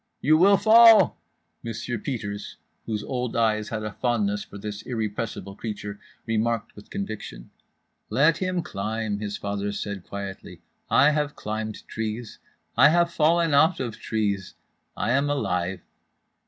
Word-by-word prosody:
"You 155 +2 +4
will 195 +5 +6
fall," 225 +2 +7 0.4
Monsieur 115 0 -4
Peters 105 -5 -5 0.3
(whose 105 -2 -2
old 125 -2 -3
eyes 110 -2 +1
had 110 -1 -3
a 105 - -3
fondness 105 -3 0
for - - -11
this 105 0 -6
irrepressible 105 -4 -4
creature) 105 -2 -6 0.3
remarked 115 0 -1
with 105 - -14
conviction.—"Let 140 - -3
him 185 -2 -1
climb," 105 -1 -3
his 105 -1 -4
father 100 0 -3
said 100 -2 -5
quietly. 100 0 -8 0.3
"I 140 +2 +5
have 150 -1 -1
climbed 110 0 -5
trees. 110 +1 -5 0.4
I 150 - +7
have 170 +1 +2
fallen 165 0 +3
out 160 +5 +4
of 120 -4 -4
trees. 100 -4 -2 0.4
I 115 - 0
am 140 +3 +2
alive." 95 -9 -1
110 Hz, 135 wpm, -25 LUFS, 105-145 Hz, 0.4 s, fall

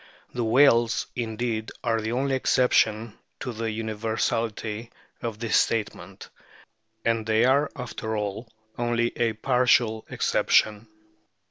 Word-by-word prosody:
The 120 - -2
whales 120 -1 +4
indeed 115 -1 -3
are 115 -2 +1
the 110 +1 -3
only 135 +2 0
exception 115 -4 +2 0.2
to 125 - -5
the 115 0 -3
universality 110 0 -2 0.3
of 115 -3 -4
this 115 0 -1
statement, 115 -2 -2 0.8
and 115 -1 +1
they 110 +2 +2
are, 140 +3 +3
after 110 -3 -4
all, 105 +2 -4 0.3
only 120 0 0
a 115 -2 +1
partial 120 -1 +2
exception. 110 +1 +1
115 Hz, 115 wpm, -25 LUFS, 110-120 Hz, 0.8 s, whales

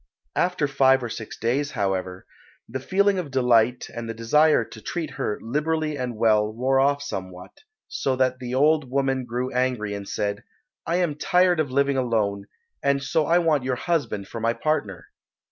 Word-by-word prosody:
After 180 -5 +1
five 135 -1 +3
or 120 - -3
six 110 -1 -7
days, 135 +6 -1
however, 95 -4 -2 0.4
the 130 +3 -4
feeling 195 +6 +2
of 170 -5 -4
delight 125 -2 +2
and 115 -1 -5
the 115 - -4
desire 150 +8 +3
to - - -12
treat 165 -4 -4
her 105 - -3
liberally 155 +5 -1
and 125 -4 -4
well 105 -1 +3
wore 130 +4 +1
off 140 +1 +2
somewhat, 95 -7 -7 0.3
so 135 - -1
that 130 0 +1
the 125 0 -4
old 150 0 +3
woman 135 -1 0
grew 125 +2 -3
angry 125 -5 0
and 100 -1 -6
said, 100 0 -2 0.4
"I 170 - +1
am 175 -4 +1
tired 180 +3 +2
of 150 -3 0
living 140 +1 +1
alone, 105 -5 0 0.3
and 140 0 +1
so 150 +3 +1
I 170 - +4
want 160 -6 +2
your 130 0 -1
husband 120 - -2
for 115 - -7
my 115 +1 +1
partner." 115 - -2
130 Hz, 180 wpm, -24 LUFS, 115-150 Hz, 0.4 s, I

